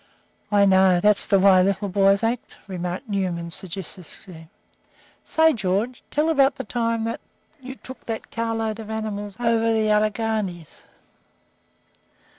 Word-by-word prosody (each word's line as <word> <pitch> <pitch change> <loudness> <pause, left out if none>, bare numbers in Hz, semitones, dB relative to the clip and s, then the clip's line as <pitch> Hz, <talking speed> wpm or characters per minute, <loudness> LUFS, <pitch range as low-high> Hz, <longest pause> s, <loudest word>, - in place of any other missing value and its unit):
"I 205 -1 +5
know, 190 -2 +4
that's 210 +2 +3
the 195 - +4
way 190 -1 +6
little 200 +2 0
boys 195 +1 +3
act," 230 +1 -2
remarked 180 +4 -5
Newman, 180 -5 -2
sagaciously. 175 -2 -7 0.7
"Say, 320 0 +3
George, 210 +3 -2
tell 300 +2 0
about 275 -3 +3
the - - -5
time 230 0 -1 0.5
you 260 0 -8
took 260 0 -13
that 225 -1 -5
car 230 -1 -2
load 220 -1 -3
of 220 -1 -8
animals 210 -2 -5
over 230 -1 +2
the 220 -1 +1
Alleghanies." 210 -5 -2
210 Hz, 130 wpm, -23 LUFS, 190-230 Hz, 0.7 s, way